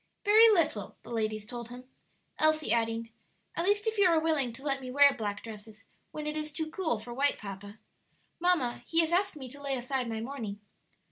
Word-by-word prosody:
"Very 435 +2 +8
little," 315 - +1
the - - -11
ladies 215 -2 -2
told 235 0 -7
him, 245 +1 -9 0.6
Elsie 310 -5 +3
adding, 230 0 -1 0.4
"At 335 - -1
least 410 +2 +2
if 445 -1 -1
you 395 - +6
are 330 -2 +4
willing 310 -6 +1
to 265 - -12
let 275 -2 0
me 255 - -7
wear 280 +2 +6
black 210 -5 -4
dresses 215 -1 -11 0.2
when 305 -1 -6
it 300 0 -3
is 305 0 -3
too 315 +1 -4
cool 320 -10 0
for 240 +3 -8
white, 280 +3 +1
papa. 200 +1 -8 0.6
Mamma, 335 -9 +1
he 330 0 +3
has 325 0 0
asked 390 0 +2
me 270 -3 -8
to 285 +3 -11
lay 275 -1 -1
aside 255 0 -2
my 225 -1 -3
mourning." 225 -4 -5
270 Hz, 205 wpm, -30 LUFS, 225-315 Hz, 0.6 s, Very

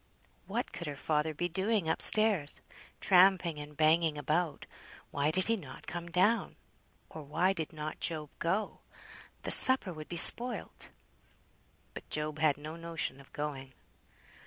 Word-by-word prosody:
What - - -6
could 170 - -9
her 145 - -7
father 150 +2 -4
be 175 +3 -5
doing 190 +1 -3
up - - -3
stairs? 210 -9 +3 0.4
Tramping 180 -4 +1
and 150 0 -13
banging 160 0 0
about. 155 +2 -4 0.5
Why 145 +1 -3
did 185 +4 -3
he 230 - 0
not 145 -11 -13
come 175 0 -9
down? 185 +7 -2 0.6
Or 160 - -11
why 175 +6 -3
did 160 -5 -7
not 155 -1 -9
Job 155 -3 -5
go? 190 +6 -4 0.6
The - - -3
supper 260 -8 +9
would 155 -1 -12
be 175 - -5
spoilt. 240 +8 +5 1.0
But - - -13
Job 150 0 -5
had 155 -2 -1
no 155 +2 -11
notion 165 -4 -6
of 135 - -22
going. 135 -3 -9
160 Hz, 150 wpm, -28 LUFS, 150-185 Hz, 1.0 s, supper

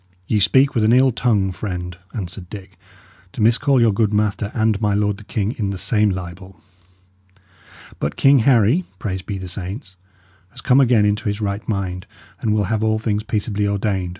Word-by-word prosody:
"Ye 105 +2 +1
speak 130 +8 +4
with 115 - +1
an 110 +2 +4
ill 130 +1 +5
tongue, 105 -5 +1
friend," 90 -2 -5 0.2
answered 90 -3 -7
Dick, 95 -2 -10 0.6
"to - - -9
miscall 125 +5 +3
your 115 -3 +4
good 105 0 +1
master 105 -1 0
and 110 -2 +1
my 105 -2 +1
lord 105 -1 0
the 105 - -13
king 105 0 -2
in 100 -3 -1
the 100 - -4
same 105 +2 +1
libel. 95 0 -7 1.4
But 70 - -2
King 140 0 +5
Harry 120 - +3
praised 95 -5 -5
be 100 - -3
the 95 -1 -7
saints! 95 +2 -7 0.5
has 125 +5 -10
come 130 +2 +4
again 120 -5 +4
into 105 0 0
his 105 0 -2
right 100 +1 -4
mind, 90 -3 -3 0.3
and 110 - -1
will 105 -1 +2
have 110 +2 -1
all 110 0 +2
things 105 -1 -1
peaceably 105 -1 -2
ordained. 100 -2 -1
105 Hz, 185 wpm, -20 LUFS, 95-110 Hz, 1.4 s, ill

